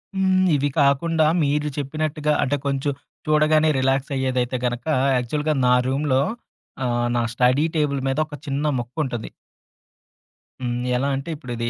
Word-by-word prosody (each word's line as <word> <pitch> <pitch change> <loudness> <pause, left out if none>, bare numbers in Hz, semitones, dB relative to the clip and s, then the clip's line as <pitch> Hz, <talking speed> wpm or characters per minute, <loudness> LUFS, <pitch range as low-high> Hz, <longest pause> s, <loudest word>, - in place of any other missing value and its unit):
హ్మ్. 190 -1 +3
ఇవి 145 0 +1
కాకుండా 155 +4 +3 0.2
మీరు 150 +1 0
చెప్పినట్టుగా 150 +1 -1
అంటే, 145 +1 0
కొంచెం 140 +1 0 0.4
చూడగానే 155 +1 +4
రిలాక్స్ 135 +2 0
అయ్యేదైతే 130 -1 0
గనుక, 120 +2 -2 0.3
యాక్చువల్‌గా 150 +5 -1
నా 125 - +5
రూమ్‌లో 135 0 +1 0.6
ఆహ్, 120 0 0
నా 120 - +2
స్టడీ 125 +4 +3
టేబుల్ 145 -3 +1
మీద 135 +2 0
ఒక 150 - -8
చిన్న 140 +1 -2 0.2
మొక్క 120 +1 -7
ఉంటది. 120 -5 -4 1.3
హ్మ్. 120 -1 -2 0.2
ఎలా 140 +2 0
అంటే 135 +4 -5
ఇప్పుడిది 120 -5 -4
140 Hz, 140 wpm, -22 LUFS, 125-150 Hz, 1.3 s, నా